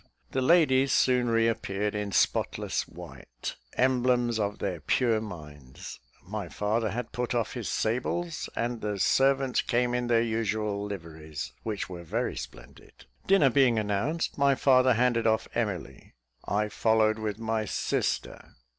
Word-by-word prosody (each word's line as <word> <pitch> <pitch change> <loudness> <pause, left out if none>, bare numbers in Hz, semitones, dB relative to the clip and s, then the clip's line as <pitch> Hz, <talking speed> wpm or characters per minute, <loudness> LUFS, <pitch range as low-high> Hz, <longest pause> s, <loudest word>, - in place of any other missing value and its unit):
The 130 - 0
ladies 135 -3 +4
soon 125 -2 +3
reappeared 115 -3 0
in 105 -1 -3
spotless - - 0
white; - - -9 0.2
emblems 125 -2 +2
of 105 -1 -1
their 90 -4 -3
pure 115 - +1
minds. 75 -10 -9 0.2
My 100 -1 -5
father 110 +6 -1
had 115 +3 -4
put 125 +1 -2
off 115 -2 -1
his 120 -4 -4
sables, 155 +9 -2
and 120 0 -2
the 105 -1 -2
servants 135 +4 +2
came 120 0 0
in 125 0 -1
their 115 -1 +3
usual 110 -2 -1
liveries, 80 -6 -7
which 105 -5 -3
were 90 -2 -8
very 115 +9 -2
splendid. - - -11 0.2
Dinner 175 -9 +5
being 125 -3 +4
announced, 110 +12 -1
my 140 -1 +4
father 130 -2 +4
handed 115 -1 +2
off 110 0 +1
Emily; 95 - -4 0.3
I 105 +1 0
followed 110 0 +2
with 105 -2 -3
my 110 -1 -1
sister. - - -2
115 Hz, 140 wpm, -28 LUFS, 105-125 Hz, 0.3 s, Dinner